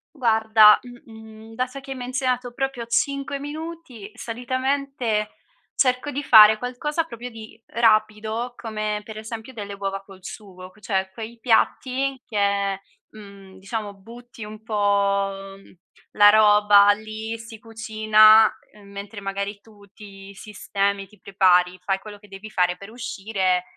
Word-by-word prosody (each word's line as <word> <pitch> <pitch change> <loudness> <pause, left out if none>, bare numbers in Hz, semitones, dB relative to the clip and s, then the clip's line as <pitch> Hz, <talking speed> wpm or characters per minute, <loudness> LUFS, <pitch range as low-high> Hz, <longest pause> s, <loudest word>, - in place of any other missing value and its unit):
Guarda, 220 -4 +5
mhmm, 245 -1 -13
mhmm, 220 0 -13
dato 255 +3 -3
che 275 - -15
hai 265 - -5
menzionato 250 0 -2
proprio 270 -2 -3
5 275 +3 -1
minuti, 295 -7 -8
solitamente 255 -2 -2 0.5
cerco 255 +2 0
di 285 - -3
fare 215 -3 +8
qualcosa 295 +6 -3
proprio 245 -5 -9
di 225 0 -12
rapido 220 +1 0
come, 215 -2 -4
per 215 0 -10
esempio, 220 +3 -8
delle 205 -3 -7
uova 195 0 -5
col 195 -1 -15
sugo 185 -3 -10
q 185 - -25
c - - -21
cioè, 190 -2 -1
quei 225 +3 -9
piatti 260 +3 0
che, 200 -2 0 0.3
mhmm, 200 -3 -14
diciamo, 205 +1 -6
butti 230 +3 -13
un 215 +1 -10
po', 200 -2 -1
mhmm, 195 - -19 0.4
la 205 0 +6
roba 210 -1 +6
lì, 220 +2 -5
si 230 0 -11
cucina, 220 -1 +4 0.2
uhm, 205 -1 -17
mentre, 200 +1 -8
magari, 200 +1 -5
tu 210 -1 -20
ti 200 -1 -13
sistemi, 200 -1 -3
ti 210 0 -22
prepari, 180 -2 +2
fai 195 +1 0
quello 205 +1 -12
che 205 - -18
devi 200 +2 -11
fare 180 -1 +1
per 200 +3 -12
uscire 195 -6 -2
215 Hz, 145 wpm, -23 LUFS, 200-240 Hz, 0.5 s, fare